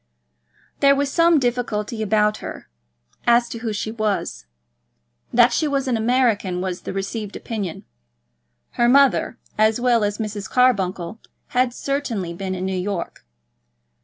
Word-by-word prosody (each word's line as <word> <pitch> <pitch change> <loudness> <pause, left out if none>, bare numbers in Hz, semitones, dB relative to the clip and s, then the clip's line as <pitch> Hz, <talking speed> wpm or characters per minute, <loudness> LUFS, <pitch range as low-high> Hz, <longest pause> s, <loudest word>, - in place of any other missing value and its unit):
There 280 0 +5
was 280 0 -1
some 335 0 +4
difficulty 235 -3 -2
about 210 0 +2
her, - - -8 0.6
as 235 0 +5
to 230 - -6
who 225 -1 -3
she 215 +1 -3
was. 215 - -2 0.8
That 240 0 +5
she 310 - +1
was 275 -2 -1
an 250 - +1
American 225 -5 +1
was 185 -1 -3
the - - -5
received 200 +2 -4
opinion. 205 -8 -5 0.9
Her 240 0 +2
mother, 275 -2 +4 0.2
as 220 +1 +3
well 240 -2 +3
as 205 0 -1
Mrs. 210 -3 -5
Carbuncle, 195 -6 +1 0.3
had 250 0 +2
certainly 240 -10 -3
been 185 +2 -4
in 185 0 -3
New 190 0 -2
York. 190 -1 -4
220 Hz, 140 wpm, -22 LUFS, 200-250 Hz, 0.9 s, There